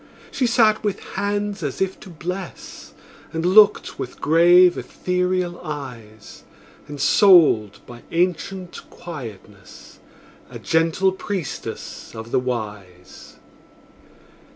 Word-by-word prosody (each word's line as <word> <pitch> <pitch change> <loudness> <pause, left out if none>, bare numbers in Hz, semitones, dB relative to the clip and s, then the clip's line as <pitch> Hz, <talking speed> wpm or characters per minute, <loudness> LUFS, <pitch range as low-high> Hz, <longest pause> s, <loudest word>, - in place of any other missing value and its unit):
She 255 - 0
sat 220 -3 +3
with 205 -2 -2
hands 205 0 -3
as 145 -4 -4
if 190 0 -2
to - - -12
bless, 180 +2 -8 0.4
And 165 +1 -3
looked 205 +3 +4
with 125 - -6
grave, 175 +3 +5
ethereal 180 -1 -2
eyes; 120 -8 -9 0.5
Ensouled 145 - +4
by 120 -1 -12
ancient 180 +1 -2
quietness, 110 - -11 0.5
A - - -9
gentle 165 +4 +1
priestess 190 - -6
of 110 +1 -8
the - - +2
Wise. 105 -7 -7
170 Hz, 100 wpm, -21 LUFS, 120-190 Hz, 0.5 s, grave